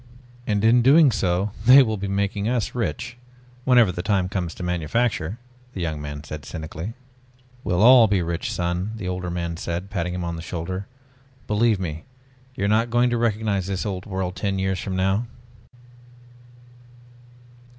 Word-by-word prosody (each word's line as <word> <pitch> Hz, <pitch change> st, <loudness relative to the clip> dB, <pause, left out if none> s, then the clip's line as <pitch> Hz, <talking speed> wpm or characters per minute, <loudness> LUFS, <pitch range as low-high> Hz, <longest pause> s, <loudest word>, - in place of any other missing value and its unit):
"And 105 Hz, -1 st, 0 dB
in 115 Hz, +2 st, +5 dB
doing 140 Hz, +3 st, +6 dB
so 95 Hz, -1 st, 0 dB, 0.2 s
they 135 Hz, +2 st, +9 dB
will 110 Hz, -3 st, -1 dB
be 100 Hz, -1 st, -4 dB
making 100 Hz, +2 st, -1 dB
us 120 Hz, -3 st, -1 dB
rich 120 Hz, 0 st, -3 dB, 0.5 s
whenever 120 Hz, -6 st, +5 dB
the 90 Hz, -, -4 dB
time 95 Hz, -1 st, 0 dB
comes 90 Hz, -4 st, -3 dB
to -, -, -7 dB
manufacture," 90 Hz, +3 st, -1 dB, 0.4 s
the -, -, -6 dB
young 80 Hz, -3 st, -3 dB
man 75 Hz, 0 st, -6 dB
said 75 Hz, 0 st, -7 dB
cynically. 80 Hz, -, -6 dB, 0.7 s
"We'll 90 Hz, +2 st, +1 dB
all 120 Hz, -1 st, +8 dB
be 100 Hz, -3 st, +1 dB
rich, 85 Hz, 0 st, -3 dB
son," 90 Hz, +4 st, -2 dB
the 105 Hz, -5 st, -6 dB
older 90 Hz, -1 st, -3 dB
man 85 Hz, -1 st, -3 dB
said, 85 Hz, +4 st, -4 dB
patting 90 Hz, -2 st, -2 dB
him 90 Hz, -, -3 dB
on 85 Hz, -1 st, -4 dB
the -, -, -6 dB
shoulder. 95 Hz, +4 st, -5 dB, 0.6 s
"Believe 105 Hz, 0 st, +2 dB
me, 80 Hz, -4 st, -5 dB, 0.5 s
you're 100 Hz, -6 st, -1 dB
not 110 Hz, +3 st, +2 dB
going 120 Hz, +1 st, +2 dB
to 120 Hz, -, +1 dB
recognize 105 Hz, -4 st, 0 dB
this 95 Hz, 0 st, -3 dB
old 95 Hz, -1 st, -4 dB
world 95 Hz, -2 st, -3 dB
ten 100 Hz, 0 st, -2 dB
years 95 Hz, -1 st, -1 dB
from 95 Hz, 0 st, -4 dB
now." 95 Hz, +5 st, +1 dB
95 Hz, 165 wpm, -23 LUFS, 90-110 Hz, 0.7 s, they